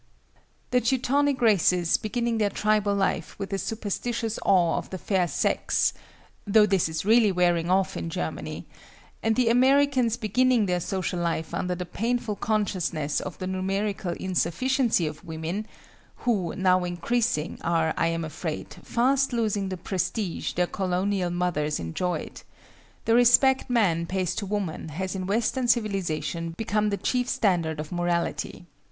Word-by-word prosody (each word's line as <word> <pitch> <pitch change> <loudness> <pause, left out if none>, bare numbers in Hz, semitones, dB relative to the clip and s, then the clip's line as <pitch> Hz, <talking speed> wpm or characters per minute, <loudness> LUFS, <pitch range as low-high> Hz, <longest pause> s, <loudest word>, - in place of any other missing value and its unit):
The 250 0 +3
Teutonic 270 +3 +1
races 180 -5 +4
beginning 235 +1 -1
their 210 -1 +2
tribal 210 0 +1
life 195 -4 -1
with 195 0 -5
a 195 - 0
superstitious 225 +2 -3
awe 180 -4 +3
of - - -9
the 190 - -5
fair 185 -1 0
sex 150 - +1 0.5
(though 210 +1 +6
this 195 -5 +1
is 160 +2 -4
really 220 -1 +5
wearing 175 -2 +2
off 190 +1 +2
in 165 - -4
Germany!), 80 - -4 0.6
and 225 0 +1
the 245 -1 +3
Americans 260 -1 +3
beginning 245 +1 +2
their 180 -2 0
social 185 0 -2
life 165 -2 -2
under 180 0 -1
the 180 0 -5
painful 230 +3 -2
consciousness 180 -9 -1
of 185 - -6
the 185 - -5
numerical 190 0 -2
insufficiency 190 - +1
of 155 +4 -6
women 165 +5 -4 0.6
(who, 195 -9 0
now 185 -1 +3
increasing, 180 0 -1
are, 165 -2 +1
I 165 - +1
am 165 0 -1
afraid, 160 0 -5
fast 270 +3 +1
losing 215 -5 0
the 185 - -4
prestige 185 +1 -2
their 180 - +2
colonial 185 0 -1
mothers 175 -4 -1
enjoyed), 155 - -3 0.6
the 225 - +3
respect 245 +3 +5
man 180 -9 +2
pays 185 -1 -1
to 200 - -4
woman 190 -6 -3
has 185 +5 -4
in 185 -1 -4
Western 235 +5 0
civilization 170 - -1
become 210 -1 0
the 200 - -1
chief 250 +3 -1
standard 170 - +1
of 155 0 -6
morality. 175 0 -2
195 Hz, 145 wpm, -26 LUFS, 175-225 Hz, 0.6 s, though